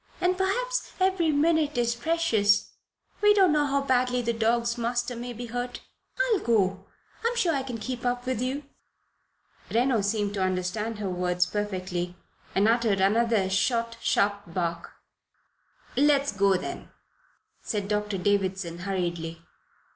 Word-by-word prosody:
And 360 Hz, 0 st, +2 dB
perhaps -, -, -1 dB
every 370 Hz, -4 st, +2 dB
minute 305 Hz, -1 st, +2 dB
is 235 Hz, -1 st, +2 dB
precious. 235 Hz, -7 st, +2 dB, 0.5 s
We 415 Hz, 0 st, +6 dB
don't 380 Hz, -4 st, +5 dB
know 295 Hz, -1 st, +2 dB
how 280 Hz, 0 st, +1 dB
badly 250 Hz, -2 st, +1 dB
the 235 Hz, 0 st, 0 dB
dog's 230 Hz, +1 st, +1 dB
master 240 Hz, +1 st, -1 dB
may 240 Hz, +1 st, -5 dB
be 240 Hz, +1 st, -6 dB
hurt. 245 Hz, +1 st, -4 dB, 0.4 s
I'll -, -, +2 dB
go. 195 Hz, -, +1 dB, 0.4 s
I'm 470 Hz, +1 st, +1 dB
sure 350 Hz, -8 st, +2 dB
I 275 Hz, -, 0 dB
can 255 Hz, -3 st, -5 dB
keep 245 Hz, +2 st, -5 dB
up 245 Hz, 0 st, -1 dB
with 255 Hz, -3 st, -1 dB
you." 265 Hz, +3 st, -2 dB, 1.1 s
Reno 240 Hz, -1 st, +2 dB
seemed 205 Hz, 0 st, -1 dB
to 200 Hz, -, -2 dB
understand 185 Hz, +4 st, -1 dB
her 205 Hz, -2 st, -3 dB
words 180 Hz, 0 st, +1 dB
perfectly, 185 Hz, -3 st, -3 dB, 0.4 s
and 200 Hz, +2 st, +4 dB
uttered 225 Hz, -4 st, +2 dB
another 215 Hz, +1 st, +3 dB
short, 230 Hz, +4 st, 0 dB
sharp 205 Hz, 0 st, +1 dB
bark. 170 Hz, -1 st, -3 dB, 1.0 s
"Let 285 Hz, +1 st, +4 dB
us 280 Hz, -, -2 dB
go, 200 Hz, -1 st, +3 dB
then," -, -, -6 dB, 0.7 s
said 205 Hz, -2 st, -3 dB
Doctor 210 Hz, -1 st, -1 dB
Davison, 190 Hz, -3 st, 0 dB
hurriedly. 170 Hz, -3 st, -3 dB
230 Hz, 145 wpm, -27 LUFS, 195-265 Hz, 1.1 s, We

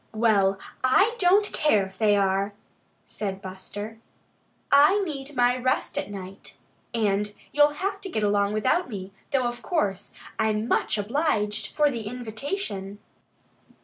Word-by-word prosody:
"Well, 200 Hz, -4 st, +3 dB, 0.3 s
I 390 Hz, -, +4 dB
don't 395 Hz, +3 st, +4 dB
care 215 Hz, -10 st, +3 dB
if 190 Hz, 0 st, -14 dB
they 210 Hz, -2 st, +4 dB
are," 195 Hz, 0 st, +1 dB, 0.5 s
said 195 Hz, -2 st, -4 dB
Buster. 205 Hz, +3 st, -8 dB, 0.7 s
"I 290 Hz, +8 st, +6 dB
need 290 Hz, -6 st, -5 dB
my 245 Hz, 0 st, +3 dB
rest 255 Hz, 0 st, -1 dB
at -, -, -3 dB
night. 195 Hz, -1 st, -9 dB, 0.3 s
And 210 Hz, -2 st, 0 dB, 0.2 s
you'll 295 Hz, 0 st, +4 dB
have 395 Hz, +4 st, -3 dB
to 390 Hz, -, -6 dB
get 220 Hz, -11 st, -2 dB
along 205 Hz, 0 st, +2 dB
without 260 Hz, +10 st, +1 dB
me, 195 Hz, -3 st, -6 dB, 0.2 s
though 265 Hz, -3 st, +1 dB
of 240 Hz, 0 st, -3 dB
course, 205 Hz, -, -1 dB, 0.3 s
I'm 220 Hz, 0 st, +1 dB
much 215 Hz, -, +1 dB
obliged 210 Hz, -2 st, -1 dB
for 295 Hz, -1 st, +4 dB
the 230 Hz, -5 st, -5 dB
invitation." 220 Hz, -, -5 dB
220 Hz, 140 wpm, -26 LUFS, 200-285 Hz, 0.7 s, I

